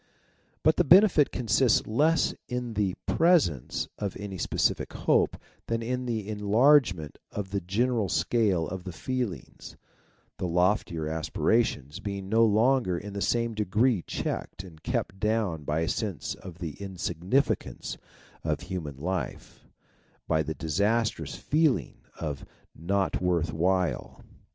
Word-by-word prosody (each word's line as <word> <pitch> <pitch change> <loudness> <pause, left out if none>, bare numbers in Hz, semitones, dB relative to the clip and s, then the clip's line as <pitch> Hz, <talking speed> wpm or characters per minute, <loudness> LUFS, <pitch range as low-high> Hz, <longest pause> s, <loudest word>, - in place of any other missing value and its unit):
But 155 - +4
the 180 - +4
benefit 175 -2 +6
consists 120 0 +2
less 155 +9 +2
in 125 -1 -3
the 100 -3 0
presence 160 - +2
of 100 -3 -3
any 100 -2 -6
specific - - 0
hope - - +2 0.3
than 115 0 -1
in 125 +2 -2
the 110 -4 -2
enlargement 105 - +3
of 100 -2 -5
the 100 -1 -1
general 110 +3 0
scale 95 -6 +1
of 90 +2 -6
the 90 - -6
feelings; 125 +2 -5 0.6
the 90 - -1
loftier 90 -1 +1
aspira 80 +9 +1
tions 75 - -6
being 100 -1 -5
no 115 +2 +4
longer 115 -2 +3
in 100 +3 -7
the 100 - -4
same 115 +1 +1
degree 105 +1 +2
checked 95 - -4
and 80 -5 -14
kept 95 +4 -2
down 105 -8 0
by 75 +3 0
a 80 - 0
sense 105 -7 -2
of 90 -3 -11
the 85 0 -6
insignificance 95 - -1 0.5
of - - -1
human 80 -7 -5
life 90 +6 -5 0.6
by 80 -1 +2
the 80 +1 -3
disastrous 100 +8 0
feeling 155 -3 +1 0.2
of 75 -4 -4
e - - -11 0.3
not 95 +4 -1
worth 85 -3 +1
while.' 90 +1 0
100 Hz, 135 wpm, -28 LUFS, 85-115 Hz, 0.6 s, benefit